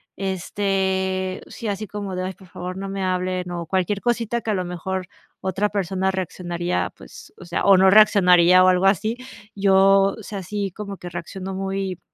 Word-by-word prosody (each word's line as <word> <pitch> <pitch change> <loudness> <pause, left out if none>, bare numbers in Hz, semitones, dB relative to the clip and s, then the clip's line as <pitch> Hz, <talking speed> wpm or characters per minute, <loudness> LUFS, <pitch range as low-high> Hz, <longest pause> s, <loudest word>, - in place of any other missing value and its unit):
este, 190 0 -1
sí, 230 - -7
así 205 +1 -3
como 200 -2 -5
de: 185 - -2
"Ay 185 - -4
por 190 0 -18
favor, 180 +1 -7
no 195 0 -5
me 195 0 -4
hablen", 185 -1 -1
o 170 -1 -4
cualquier 190 +3 -1
cosita 235 -1 0
que 220 - -2
a - - +1
lo 185 -2 -1
mejor 180 +1 -4 0.3
otra 190 +2 0
persona 190 -1 -1
reaccionaría, 175 -1 -3
pues, - - -14
o - - -12
sea, 170 +1 -2
o 200 - +7
no 190 +1 +6
reaccionaría 185 -3 +6
o 185 - +5
algo 185 +1 +2
así, 215 +4 +2 0.4
yo, 195 0 +4
o 220 - -10
sea, 200 -1 -6
sí, 200 +1 -3
como 200 +1 -7
que 180 - -8
reacciono 185 +3 -6
muy 190 -1 -3
190 Hz, 190 wpm, -22 LUFS, 185-195 Hz, 0.4 s, o